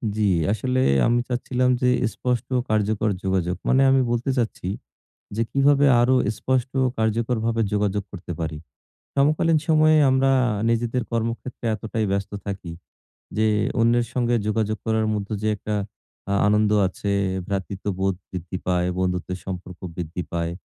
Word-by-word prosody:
জি, 110 - -2 0.3
আসলে 130 +3 0 0.3
আমি 120 +1 +3
চাচ্ছিলাম 125 +1 0
যে 125 - +3 0.3
স্পষ্ট 125 -3 -2
ও - - +1
কার্যকর 110 0 +1
যোগাযোগ। 95 -2 0
মানে 135 +1 +4
আমি 135 0 +4
বলতে 120 +3 -1
চাচ্ছি, 110 -6 -2 0.7
যে 115 - +2
কিভাবে 140 +1 +4
আরো 130 +2 +4 0.2
স্পষ্ট 130 -1 0
ও - - +3
কার্যকরভাবে 115 +1 0
যোগাযোগ 105 -1 0
করতে 90 -2 -7
পারি? 80 -1 -3 0.6
সমকালীন 155 +3 +3
সময়ে 155 0 +5
আমরা 135 +1 +3 0.4
নিজেদের 120 +1 0
কর্মক্ষেত্রে 115 +2 -3
এতটাই 110 +1 -3
ব্যস্ত 100 +1 -2
থাকি, 95 -4 -5 0.6
যে 110 0 +3 0.3
অন্যের 120 +1 +3
সঙ্গে 120 -1 +1
যোগাযোগ 110 0 0
করার 110 -1 +1
মধ্যে 105 +1 -3
যে 110 - +1
একটা 105 +1 -4 0.6
আ - - +2
আনন্দ 105 0 +3 0.2
আছে, 100 +2 -3 0.4
ভ্রাতৃত্ববোধ 95 0 -2 0.2
বৃদ্ধি 90 0 -5
পায়, 90 -1 +1
বন্ধুত্বের 90 0 -1
সম্পর্ক 90 -1 -6 0.2
বৃদ্ধি 90 +1 -4
পায়, 85 0 -1
110 Hz, 140 wpm, -23 LUFS, 95-125 Hz, 0.7 s, সময়ে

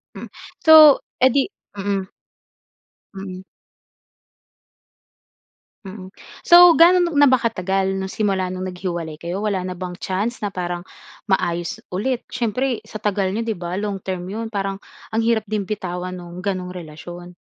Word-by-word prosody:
Hmm. - - -8 0.4
So 310 -3 +9 0.2
eh, 260 - +6
di 275 +2 +2 0.3
mm. 195 -1 -2 1.0
Mm. 190 -1 -7 2.4
Mm, 190 0 -10 0.3
so, 345 -1 +8
gaano 355 +2 +7 0.2
na 290 - +7
ba 260 -2 +4
katagal 195 -3 -1
'no, 190 - -3
simula 190 -2 -1
nung 185 0 -4
naghiwalay 175 -4 -5
kayo? 170 +5 -5
Wala 200 -3 -1
na 185 - -4
bang 180 0 -6
chance 200 +7 -2
na 200 - -2
parang 175 -1 -4 0.4
maayos 175 -4 -1
ulit? 235 +7 -2
Siyempre 250 +1 -2
sa 215 - -9
tagal 195 -2 0
niyo, 220 - -2
'di 225 -3 -2
ba, 175 +2 -4
long 205 -1 -2
term 185 -1 -5
'yon, 220 +3 -5
parang 195 -1 -2 0.3
ang 225 0 -1
hirap 220 -3 +1
din 210 -2 -2
bitawan 185 -3 -4
no'ng 175 +2 -10
ganong 185 -2 -2
relasyon. 175 +2 -9
195 Hz, 145 wpm, -21 LUFS, 180-220 Hz, 2.4 s, So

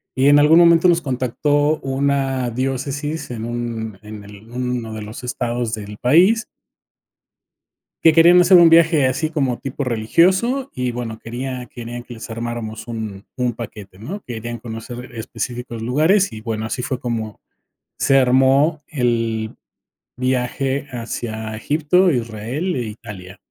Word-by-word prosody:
y 135 +2 +3
en 145 0 +7
algún 155 +3 +6
momento 170 0 +6
nos 170 0 +3
contactó 145 +4 +1
una 135 -2 0
diócesis 140 +5 -3
en 115 -1 -5
un 115 -3 -4
en 105 -1 -10
el 105 +2 -14
uno 125 -2 -3
de 110 - -6
los 110 +4 -9
estados 120 -2 -2
del 105 -1 -8
país 185 - +4 1.6
que 160 -1 +7
querían 170 +2 +7
hacer 180 +1 +7
un 170 -1 +8
viaje 165 -4 +5
así 140 +5 -1
como 135 -6 0
tipo 140 +1 -4
religioso 185 - +2
y 125 -1 -1
bueno 115 -2 -5
querían 125 +2 -5
querían 120 0 -8
que 120 - -10
les 115 - -9
armáramos 115 -1 -5
un 110 -4 -6
un 125 -1 -1
paquete, 105 -4 -9
¿no? 165 - -7
Querían 120 0 -5
conocer 120 +2 -8
específicos 120 0 -5
lugares 160 - +2
y 110 -1 -8
bueno, 110 0 -3
así 125 - -3
fue 130 0 -3
como 115 -4 -4 0.6
se 135 - +4
armó 135 +4 +3
el 115 -5 -1 0.6
viaje 130 +2 -1
hacia 110 -2 -5
Egipto, 155 +10 +2
Israel 120 - -2
e 125 - -1
Italia. 105 -4 -9
125 Hz, 145 wpm, -20 LUFS, 115-145 Hz, 1.6 s, un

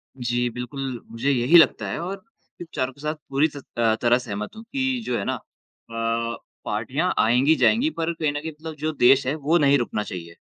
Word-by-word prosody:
जी, 120 -1 -1
बिल्कुल, 125 +1 -5
मुझे 115 +5 -1
यही 130 +6 +5
लगता 165 - +4
है - - -3
और 180 +4 -3
आपके 210 -3 -16
विचारों 135 -5 -3
के 140 - -17
साथ 155 +1 -2
पूरी 140 +3 +3
तत 140 - -9
अ, 110 -1 +3
तरह 120 0 +4
से 125 - -8
सहमत 105 +1 -5
हूँ 220 - -9
कि 265 -3 0
जो 120 - -1
है 100 - -2
ना - - 0
अ, 115 0 -5 0.3
पार्टियाँ 130 +12 -1
आएँगी, 125 +7 +4
जाएँगी 240 - +3
पर 165 +1 -1
कहीं 155 -3 -1
न 145 - -3
कहीं 160 +1 -5
मतलब 155 +1 -9
जो 155 +1 -2
देश 135 -1 +4
है, 135 - 0
वो 155 +3 +2
नहीं 140 -3 +4
रुकना 115 -4 -2
चाहिए। 85 -3 -8
135 Hz, 215 wpm, -24 LUFS, 120-160 Hz, 0.3 s, यही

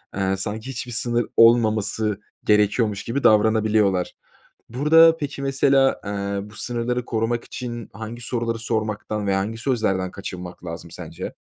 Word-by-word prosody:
eee, 95 0 0
sanki 110 +5 -4
hiçbir 125 -1 -5
sınır 120 +1 0
olmaması 110 -2 +3 0.2
gerekiyormuş 105 0 +2
gibi 135 +4 -3
davranabiliyorlar. 105 -3 +3 0.6
Burada, 160 +6 +5
peki, 145 -2 -5
mesela, 135 0 +2
eee, 100 0 -3
bu 110 - -15
sınırları 120 +1 -2
korumak 115 +1 -1
için 120 -3 -7
hangi 110 +3 -7
soruları 115 -1 -2
sormaktan 110 -2 -2
ve 95 - +2
hangi 105 +4 -2
sözlerden 110 -7 0
kaçınmak 90 -2 -8
lazım 85 0 -7
sence? - - -7
110 Hz, 130 wpm, -23 LUFS, 100-120 Hz, 0.6 s, Burada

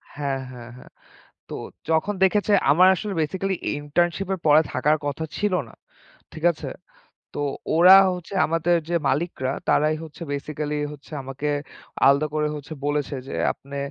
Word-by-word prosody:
হ্যাঁ, 140 -2 -2
হ্যাঁ, 120 -2 -10
হ্যাঁ। - - -14 0.6
তো - - -6 0.4
যখন 160 +6 +1
দেখেছে 205 +2 +3 0.2
আমার 180 +6 +6
আসলে 200 +3 -4
basically 190 +5 -1 0.2
internship 175 +6 0
এর - - -6
পরে 150 +1 +7
থাকার 150 +4 +2
কথা 145 +2 -3
ছিল 210 -1 0 0.2
না, - - -16 0.6
ঠিক 160 - -9
আছে? 155 - -8 0.7
তো - - -5 0.4
ওরা 180 +3 +9 0.2
হচ্ছে 180 +2 -10
আমাদের 165 +2 +1
যে 175 - 0
মালিকরা, 135 -3 -1 0.2
তারাই 155 +1 +3
হচ্ছে 160 +1 -12
basically 150 +1 -3 0.2
হচ্ছে 145 +1 -16
আমাকে 135 +3 -5 0.6
আলাদা 140 +2 +4
করে 150 0 +1
হচ্ছে 150 +1 -8
বলেছে 145 -1 -1
যে, - - -6 0.2
"আপনি 140 +1 -10
155 Hz, 150 wpm, -23 LUFS, 145-175 Hz, 0.7 s, ওরা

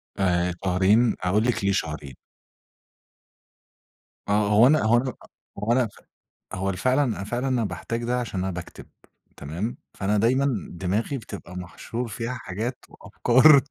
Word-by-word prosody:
آآ، 90 -2 +1
شهرين، 100 +6 +3
أقول 100 +4 +2
لِك 120 -3 0
ليه 100 - +3
شهرين. 75 -8 -3 2.1
آه، 105 0 +3
هو 110 +4 +6
أنا 155 -2 +4
هو 115 +2 +4
أنا 130 +1 -1 0.4
هو 110 +3 -1
أنا 125 -1 +3
فع - - -19 0.5
هو 95 +1 -1
أنا 90 - -3
فعلًا، 130 +8 +2
أنا 115 -7 -2
فعلًا 120 +6 -2
أنا 125 -3 +1
باحتاج 110 +6 -4
ده 125 +1 0
عشان 110 -6 -3
أنا 95 - -1
باكتب، 90 0 -8 0.5
تمام؟ 85 - -4 0.2
فأنا 105 +2 0
دايمًا 130 +6 +3 0.2
دماغي 100 +10 -2
بتبقى 100 -6 -9
محشور 100 +7 -5
فيها 115 +3 -4
حاجات 120 +1 -5
وأفكار. 135 +4 +5
110 Hz, 150 wpm, -25 LUFS, 95-125 Hz, 2.1 s, هو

